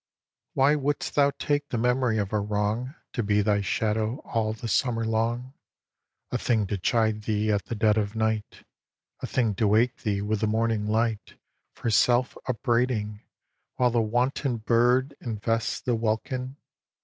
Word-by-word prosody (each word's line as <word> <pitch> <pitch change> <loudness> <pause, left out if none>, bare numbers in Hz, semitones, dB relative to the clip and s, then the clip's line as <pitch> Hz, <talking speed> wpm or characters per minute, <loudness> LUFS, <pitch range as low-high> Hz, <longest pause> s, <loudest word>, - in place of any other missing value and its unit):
xi. - - -67
Why 140 +3 +4
wouldst 145 0 -2
thou 140 -1 +4
take 145 -1 -1
the 120 - -2
memory 125 -1 +1
of 105 -1 -2
a 105 - +2
wrong 105 +6 -2 0.2
To 120 - -1
be 105 -1 +2
thy 100 -1 +2
shadow 110 +3 0
all 110 -1 -1
the 110 +2 -6
summer 115 0 +1
long, 115 +3 -1 0.8
A - - -1
thing 110 -4 +1
to 100 0 -3
chide 110 +2 +1
thee 110 0 +1
at 100 -1 0
the 115 - -4
dead 105 0 +3
of 105 +1 -3
night, 110 -1 -2 0.6
A - - -4
thing 115 -5 +1
to 105 +2 +1
wake 115 +4 +3
thee 100 -2 -1
with 105 0 -1
the 110 - +2
morning 110 -1 0
light 110 0 -1 0.4
For 115 - -2
self 120 +3 +3
upbraiding, 115 -4 0 0.5
while 125 -1 +2
the 115 0 +2
wanton 125 +3 0
bird 125 +4 +2
Invests 115 -1 -1
the 125 - 0
welkin? 120 +4 -2
115 Hz, 165 wpm, -26 LUFS, 105-125 Hz, 0.8 s, Why